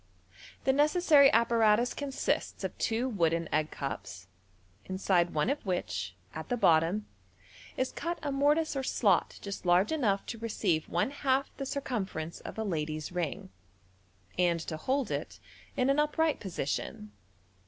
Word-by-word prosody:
The 265 - +3
necessary 295 -1 +5
apparatus 230 0 +3
consists 280 -2 -2
of - - -3
two 230 +2 0
wooden 165 -7 +1
egg 155 0 +1
cups, 100 -9 -6 0.6
inside 185 -2 +1
one 150 +5 +2
of 290 - -3
which, 95 - -3 0.2
at 160 - -7
the 245 - 0
bottom, 170 +2 +3 0.7
is 260 0 0
cut 340 +1 -3
a 290 - -1
mortice 295 +3 +2
or 270 - 0
slot 205 -7 +1
just 200 -1 -5
large 180 - +3
enough 220 -11 +1
to 230 - -6
receive 200 -8 -1
one 175 +10 0
half 275 -1 0
the 275 - -4
circumference 195 - -3
of - - -9
a 220 - -1
lady's 155 -5 -3
ring, 170 - -3 0.9
and 175 -2 +3
to 160 - -5
hold 260 - -1
it - - -4 0.4
in 255 - +2
an 275 +2 +3
upright 305 +1 +1
position. 140 - -4
210 Hz, 145 wpm, -30 LUFS, 165-270 Hz, 0.9 s, necessary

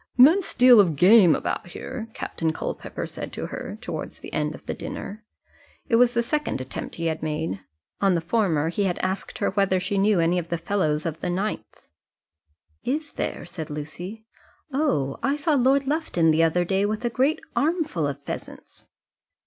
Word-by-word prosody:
"Immense 325 +9 +6
deal 250 -2 +8
of 175 -6 +4
game 185 +1 +7
about - - -3
here," 225 +5 -7
Captain 160 -1 -2
Culpepper - - -5
said - - -7
to - - -4
her - - -6
towards - - -6
the - - -10
end 150 0 -1
of - - -15
the - - -3
dinner. 215 +3 -7 0.6
It 230 - +3
was 245 0 +4
the 235 - +2
second 295 - -1
attempt 130 0 -6
he 165 - -4
had 160 -1 -1
made; 155 -9 -2 0.4
on 195 -2 +3
the - - +2
former 165 -4 +1
he 200 +4 0
had 180 -2 0
asked 190 +1 -3
her 200 - 0
whether 195 -1 +2
she 195 +2 -1
knew 200 -1 +3
any 170 +2 +2
of 170 -1 -7
the 170 - -1
fellows 165 -4 0
of 165 -1 -3
the - - -3
9th. 180 - -3 1.0
"Is 295 +2 -2
there?" - - -3
said 170 -3 -7
Lucy. 175 +9 -7 0.5
"Oh! 205 - 0
I 275 +1 +1
saw 300 +2 0
Lord 270 +1 +3
Lufton 275 - +1
the 160 +1 +3
other 165 +2 +2
day 195 +2 +1
with 215 +3 -1
a 240 - 0
great 270 +6 +2 0.2
armful 300 - 0
of 140 - -5
pheasants." - - -8
190 Hz, 185 wpm, -25 LUFS, 165-245 Hz, 1.0 s, deal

